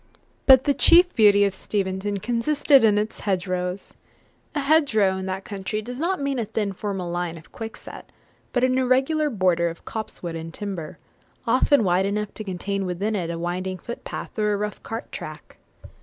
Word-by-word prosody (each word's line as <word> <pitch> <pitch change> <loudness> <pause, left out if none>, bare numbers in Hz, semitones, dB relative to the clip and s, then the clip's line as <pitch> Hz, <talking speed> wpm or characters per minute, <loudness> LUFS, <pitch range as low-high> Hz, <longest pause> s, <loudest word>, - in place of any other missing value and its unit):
But 260 -1 +8
the 285 - +2
chief 350 +5 +6
beauty 205 -3 +5
of 200 - 0
Steventon 195 +1 -2
consisted 265 +6 +3
in 210 -2 +5
its 210 +1 -2
hedgerows. 185 -1 -2 0.6
A - - +1
hedgerow, 275 -10 +3
in 190 0 -5
that 190 +1 -4
country, 200 +1 -4
does 245 +4 -7
not 365 +4 0
mean 280 -2 -1
a 230 - -1
thin 210 -2 -2
formal 190 -3 -4
line 175 -1 -3
of 160 - -15
quickset, 225 0 -9 0.5
but 245 - 0
an 255 0 +3
irregular 265 +4 +2
border 180 -7 +2
of 165 - -11
copse 220 -3 -6
wood 170 -1 -4
and 165 0 -6
timber, 190 -7 -5 0.5
often 255 +1 +4
wide 185 +1 +2
enough 210 +1 -2
to 215 - -6
contain 195 0 -3
within 200 +5 -2
it 175 -4 -2
a 170 - -3
winding 180 +2 -3
footpath, 235 +2 -7
or 210 -1 +2
a - - 0
rough 210 0 -4
cart 225 +1 -6
track. - - -9
205 Hz, 180 wpm, -24 LUFS, 185-240 Hz, 0.6 s, But